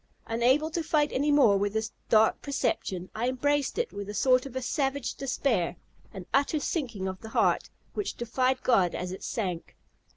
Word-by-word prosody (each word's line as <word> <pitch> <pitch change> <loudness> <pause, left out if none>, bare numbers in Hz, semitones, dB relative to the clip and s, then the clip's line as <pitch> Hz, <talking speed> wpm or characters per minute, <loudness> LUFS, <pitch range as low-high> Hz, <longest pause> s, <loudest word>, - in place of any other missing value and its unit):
Unable 255 +7 +2
to 335 - -1
fight 305 -2 +1
any 290 +3 +1
more 250 -9 +5
with 200 +1 -1
this 220 0 -2 0.2
dark 220 0 +4
perception, 190 -9 -2
I 235 +3 0
embraced 285 +2 0
it 475 0 -1
with 200 0 -6
a 210 - -5
sort 255 +4 +3
of 260 -1 -5
savage 275 -1 -1
despair, 245 -9 0 0.4
an 190 -2 -8
utter 285 +3 +2
sinking 245 - -2
of 190 0 -5
the 220 - -8
heart, - - +2 0.2
which 415 -1 -3
defied 255 +2 0
God 190 -8 +3
as 180 0 -4
it 190 - -7
sank. 180 -7 -3
250 Hz, 175 wpm, -28 LUFS, 205-280 Hz, 0.4 s, more